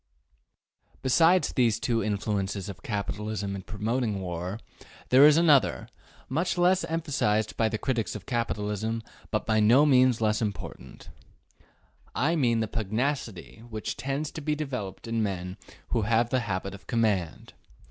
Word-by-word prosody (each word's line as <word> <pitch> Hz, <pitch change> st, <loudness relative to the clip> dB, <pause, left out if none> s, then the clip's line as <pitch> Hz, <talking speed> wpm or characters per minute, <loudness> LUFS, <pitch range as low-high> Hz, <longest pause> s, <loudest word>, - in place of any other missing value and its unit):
Besides 165 Hz, +7 st, +4 dB
these 115 Hz, -4 st, +2 dB
two 115 Hz, -2 st, 0 dB
influences 100 Hz, -1 st, -2 dB
of 95 Hz, -1 st, -9 dB
capitalism 105 Hz, -1 st, -3 dB
in 95 Hz, -, -5 dB
promoting 110 Hz, +1 st, -2 dB
war, 90 Hz, +2 st, -4 dB, 0.5 s
there 135 Hz, +3 st, +8 dB
is 150 Hz, 0 st, +5 dB
another, 155 Hz, -5 st, +3 dB, 0.4 s
much 165 Hz, +7 st, -1 dB
less 180 Hz, +1 st, +3 dB
emphasized 140 Hz, -10 st, 0 dB
by 110 Hz, -1 st, +1 dB
the 110 Hz, -, -2 dB
critics 115 Hz, -2 st, -2 dB
of 100 Hz, -3 st, -8 dB
capitalism, 110 Hz, -2 st, -2 dB, 0.3 s
but -, -, -1 dB
by 110 Hz, 0 st, +2 dB
no 120 Hz, +8 st, +6 dB
means 130 Hz, -4 st, +4 dB
less 110 Hz, 0 st, +1 dB
important: 105 Hz, -3 st, -6 dB, 1.1 s
I 155 Hz, +7 st, +1 dB
mean 120 Hz, -7 st, +2 dB
the 110 Hz, -, -1 dB
pugnacity 110 Hz, -1 st, -3 dB
which 110 Hz, -1 st, -4 dB
tends 140 Hz, +3 st, -3 dB
to 160 Hz, -, -7 dB
be 150 Hz, +1 st, -1 dB
developed 125 Hz, -11 st, -5 dB
in 115 Hz, 0 st, -1 dB
men 90 Hz, -3 st, -3 dB, 0.3 s
who 115 Hz, -, +1 dB
have 115 Hz, +2 st, +1 dB
the 130 Hz, -, +2 dB
habit 95 Hz, +1 st, -3 dB
of 100 Hz, -, -13 dB
command. 105 Hz, -8 st, -1 dB
115 Hz, 145 wpm, -27 LUFS, 105-130 Hz, 1.1 s, there